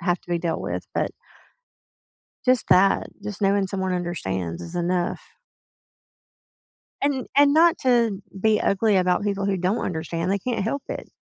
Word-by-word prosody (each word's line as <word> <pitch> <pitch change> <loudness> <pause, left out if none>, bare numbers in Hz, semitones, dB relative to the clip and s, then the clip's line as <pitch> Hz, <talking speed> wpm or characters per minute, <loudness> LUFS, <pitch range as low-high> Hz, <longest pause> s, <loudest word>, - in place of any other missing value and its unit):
have 175 -1 +1
to - - -14
be 170 - +1
dealt 165 -1 -2
with, - - -4
but - - 0 1.4
just 255 -1 +3
that, 195 +2 +4
just 205 0 -6
knowing 200 0 +2
someone 190 -1 -2
understands 95 - -3
is 170 +1 -9
enough. 175 0 -1 1.8
And 275 -3 0
and 285 0 +5
not 335 +2 +5
to 235 -6 +2 0.2
be 215 +2 +2
ugly 200 +1 +2
about 180 +1 +2
people 200 -1 -1
who 195 -1 +1
don't 185 +5 0
understand, 165 +1 -3
they 200 - +1
can't 230 0 -2
help 270 +7 -2
it. - - -6
195 Hz, 155 wpm, -24 LUFS, 175-220 Hz, 1.8 s, and